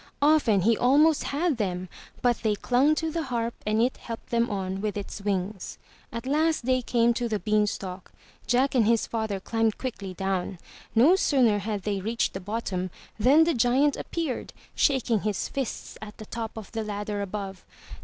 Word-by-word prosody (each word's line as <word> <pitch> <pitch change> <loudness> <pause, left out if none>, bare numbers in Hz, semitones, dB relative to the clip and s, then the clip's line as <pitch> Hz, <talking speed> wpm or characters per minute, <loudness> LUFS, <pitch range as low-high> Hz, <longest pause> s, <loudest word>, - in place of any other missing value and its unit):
Often 290 -10 +4
he 225 +5 +4
almost 290 +7 +4
had 300 0 0
them, 185 -4 -2 0.4
but 245 -1 +3
they 215 -2 0
clung 260 +8 +3
to 320 +1 -1
the 330 - -1
Harp 235 -5 -2
and 215 +1 +2
it 255 - 0
helped 230 -1 -8
them 235 0 +2
on 190 -2 -3
with 210 -1 -2
its 200 0 -6
wings. 195 -1 -3 0.3
At 230 +1 -5
last 310 0 +1
they 255 0 +2
came 235 -1 +2
to 240 0 -2
the 215 - 0
beanstalk. 205 -3 -1 0.4
Jack 255 +3 +2
and 235 -5 +3
his 230 -1 +3
father 220 -4 -2
climbed 225 +2 0
quickly 200 -8 -5
down. 190 0 -2 0.4
No 275 +11 +6
sooner 250 - +3
had 205 -1 -3
they 200 -2 -1
reached 225 +4 -1
the 190 - -4
bottom, 190 -2 -3 0.3
than 275 +9 +6
the 335 +1 +2
giant 255 +4 +3
appeared, 325 -7 -4 0.2
shaking 250 -5 +2
his 210 -3 -1
fists 270 -4 -5
at 215 -1 -9
the 215 - -9
top 225 0 -5
of 220 - -8
the 225 -1 -3
ladder 205 0 -3
above. 195 -1 -5
225 Hz, 180 wpm, -26 LUFS, 205-255 Hz, 0.4 s, No